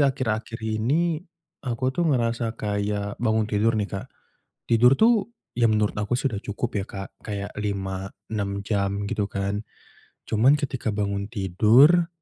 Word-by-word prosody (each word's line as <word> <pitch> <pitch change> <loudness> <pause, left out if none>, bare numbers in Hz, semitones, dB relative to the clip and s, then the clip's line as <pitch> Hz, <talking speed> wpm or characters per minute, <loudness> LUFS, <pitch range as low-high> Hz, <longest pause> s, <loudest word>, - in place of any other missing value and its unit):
akhir-akhir 115 -5 0
ini 130 +10 0 0.4
aku 130 +1 -1
tuh 170 +3 +1
ngerasa 115 -3 0
kayak 100 0 -2
bangun 110 -2 +2
tidur 110 +2 +1
nih 105 - +1
Kak, 100 - -4 0.6
tidur 120 +3 +5
tuh 225 -1 +4 0.2
ya 115 -2 +3
menurut 105 -1 +2
aku 105 +3 0
sudah 125 -6 -1
cukup 110 +4 -3
ya - - -3
Kak. 95 0 -6
Kayak 100 -2 -5
5 95 -2 -3 0.2
6 100 -2 -2
jam 100 -1 -1
gitu 100 0 -1
kan. 100 +2 -2 0.6
Cuman 120 +7 +4
ketika 130 -6 -2
bangun 100 -1 -1
tidur, 115 - +5
110 Hz, 140 wpm, -25 LUFS, 100-125 Hz, 0.6 s, tidur